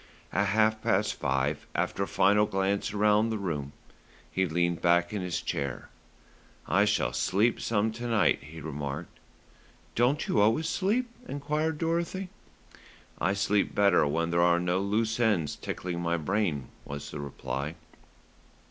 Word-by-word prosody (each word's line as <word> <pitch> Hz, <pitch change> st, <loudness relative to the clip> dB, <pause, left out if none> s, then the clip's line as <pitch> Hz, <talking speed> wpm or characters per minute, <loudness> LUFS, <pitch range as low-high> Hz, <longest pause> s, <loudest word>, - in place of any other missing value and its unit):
At 100 Hz, +1 st, +2 dB
half 110 Hz, +2 st, +2 dB
past -, -, +1 dB
five, 70 Hz, +3 st, -1 dB
after -, -, -1 dB
a -, -, 0 dB
final 105 Hz, +2 st, +3 dB
glance 95 Hz, +1 st, 0 dB
round 105 Hz, +2 st, +3 dB
the 110 Hz, -, -1 dB
room, 75 Hz, -8 st, -3 dB, 0.6 s
he 95 Hz, 0 st, +1 dB
leaned 85 Hz, +1 st, 0 dB
back 85 Hz, +1 st, +3 dB
in 105 Hz, -, -2 dB
his 90 Hz, -2 st, -2 dB
chair. 70 Hz, -2 st, -4 dB, 0.8 s
"I -, -, +4 dB
shall -, -, +1 dB
sleep 100 Hz, -, +1 dB
some 110 Hz, 0 st, +1 dB
to 120 Hz, +2 st, -5 dB
night," 105 Hz, -8 st, +3 dB
he 80 Hz, +2 st, -10 dB
remarked. 75 Hz, +1 st, -5 dB, 0.7 s
"Don't 125 Hz, +6 st, +1 dB
you 105 Hz, -, +2 dB
always 115 Hz, +10 st, +3 dB
sleep?" 215 Hz, +9 st, +1 dB, 0.2 s
enquired 150 Hz, +2 st, -1 dB
Dorothy. 170 Hz, +3 st, -1 dB, 0.9 s
"I 95 Hz, +4 st, +1 dB
sleep 100 Hz, 0 st, +1 dB
better 100 Hz, -7 st, +4 dB
when 85 Hz, +3 st, 0 dB
there 85 Hz, 0 st, +3 dB
are 85 Hz, 0 st, +4 dB
no 90 Hz, +1 st, 0 dB
loose 110 Hz, +3 st, 0 dB
ends 105 Hz, -10 st, +2 dB
tickling 90 Hz, -1 st, -4 dB
my 85 Hz, 0 st, 0 dB
brain," 85 Hz, -5 st, -1 dB
was 70 Hz, 0 st, -7 dB
the 75 Hz, -, -6 dB
reply. 70 Hz, +1 st, -4 dB
95 Hz, 150 wpm, -29 LUFS, 80-110 Hz, 0.9 s, I